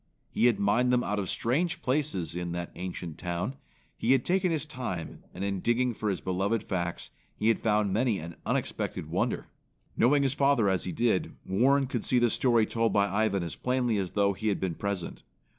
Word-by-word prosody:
He 120 Hz, -, +3 dB
had 115 Hz, -5 st, +2 dB
mined 110 Hz, +5 st, +3 dB
them 125 Hz, 0 st, +3 dB
out 105 Hz, 0 st, -1 dB
of 95 Hz, -, -3 dB
strange 170 Hz, +8 st, 0 dB
places 130 Hz, -, 0 dB
in 90 Hz, -1 st, -3 dB
that 85 Hz, 0 st, -4 dB
ancient 90 Hz, -3 st, -6 dB
town. 90 Hz, +9 st, -3 dB, 0.4 s
He 125 Hz, -, +2 dB
had 135 Hz, -, +2 dB
taken 185 Hz, 0 st, +2 dB
his 155 Hz, -2 st, -1 dB
time 120 Hz, -, -5 dB
and -, -, -6 dB
in 100 Hz, -1 st, -1 dB
digging 120 Hz, +4 st, +1 dB
for 110 Hz, -1 st, -2 dB
his 95 Hz, -, -2 dB
beloved 100 Hz, +4 st, 0 dB
facts, 85 Hz, -2 st, -3 dB, 0.2 s
he 110 Hz, -, +1 dB
had 115 Hz, -, +2 dB
found 105 Hz, -3 st, +1 dB
many 115 Hz, 0 st, +2 dB
an 85 Hz, 0 st, -7 dB
unexpected -, -, -2 dB
wonder. -, -, -1 dB, 0.5 s
Knowing 140 Hz, +4 st, +4 dB
his 135 Hz, -1 st, +2 dB
father 140 Hz, -7 st, +3 dB
as 95 Hz, -1 st, 0 dB
he 90 Hz, -, -3 dB
did, 115 Hz, -4 st, 0 dB
Warren 135 Hz, +8 st, +3 dB
could 125 Hz, -4 st, -3 dB
see 125 Hz, -, +2 dB
the 120 Hz, -2 st, +3 dB
story 120 Hz, -4 st, +3 dB
told 115 Hz, +1 st, 0 dB
by 100 Hz, 0 st, +3 dB
Ivan 100 Hz, -2 st, +1 dB
as 85 Hz, -, -4 dB
plainly 125 Hz, -4 st, 0 dB
as 95 Hz, -2 st, -3 dB
though 100 Hz, -1 st, +2 dB
he 110 Hz, +4 st, -4 dB
had 105 Hz, -, +1 dB
been 95 Hz, -3 st, -1 dB
present. 100 Hz, -1 st, -4 dB
110 Hz, 205 wpm, -29 LUFS, 95-125 Hz, 0.5 s, Knowing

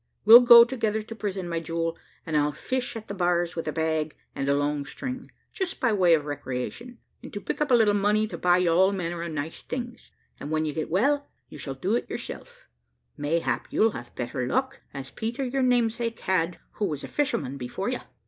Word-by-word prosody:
We'll 225 Hz, +3 st, +11 dB
go 240 Hz, -1 st, +10 dB
together 225 Hz, -3 st, -1 dB
to 225 Hz, -, -8 dB
prison, 195 Hz, -4 st, -4 dB
my 170 Hz, -1 st, -2 dB
jewel, 165 Hz, 0 st, -2 dB, 0.3 s
and 160 Hz, -, -3 dB
I'll 150 Hz, 0 st, +2 dB
fish 255 Hz, -, -3 dB
at 220 Hz, -1 st, -7 dB
the -, -, -5 dB
bars 175 Hz, -2 st, 0 dB
with 165 Hz, -, -4 dB
a -, -, 0 dB
bag 160 Hz, -1 st, -1 dB, 0.2 s
and 135 Hz, -, -2 dB
a 140 Hz, -, +4 dB
long 145 Hz, 0 st, 0 dB
string, 255 Hz, -, -6 dB, 0.2 s
just 380 Hz, -2 st, -3 dB
by 235 Hz, -3 st, +2 dB
way 180 Hz, -4 st, +5 dB
of 150 Hz, -2 st, -3 dB
recreation, 145 Hz, -, -5 dB, 0.2 s
and -, -, -10 dB
to 205 Hz, -, -4 dB
pick 205 Hz, -, -4 dB
up 300 Hz, -, +1 dB
a 250 Hz, -, +6 dB
little 220 Hz, -3 st, +4 dB
money 205 Hz, +1 st, +2 dB
to -, -, -6 dB
buy 180 Hz, 0 st, +4 dB
you 180 Hz, -2 st, +2 dB
all 190 Hz, +4 st, +4 dB
manner 175 Hz, -3 st, -3 dB
of 170 Hz, -1 st, -4 dB
nice 155 Hz, +1 st, -5 dB
things; 240 Hz, -1 st, -6 dB, 0.3 s
and 145 Hz, -, -6 dB
when 155 Hz, 0 st, 0 dB
you 150 Hz, -, -2 dB
get 155 Hz, 0 st, -3 dB
well, 285 Hz, -, +1 dB, 0.2 s
you -, -, -11 dB
shall 135 Hz, -2 st, -5 dB
do 190 Hz, -, 0 dB
it -, -, -2 dB
yourself -, -, -7 dB, 0.5 s
mayhap 160 Hz, +3 st, -1 dB
you'll 225 Hz, +1 st, +3 dB
have 120 Hz, -8 st, -9 dB
better 125 Hz, +1 st, -3 dB
luck, 260 Hz, -, -1 dB
as 135 Hz, -1 st, -7 dB
Peter 235 Hz, +4 st, -3 dB
your 265 Hz, +2 st, -1 dB
namesake 235 Hz, -2 st, +1 dB
had, 175 Hz, -2 st, 0 dB, 0.2 s
who 210 Hz, -, 0 dB
was 150 Hz, -7 st, -3 dB
a -, -, -5 dB
fisherman 235 Hz, -, -1 dB
before 125 Hz, -2 st, -4 dB
you. -, -, -2 dB
185 Hz, 215 wpm, -26 LUFS, 155-235 Hz, 0.5 s, We'll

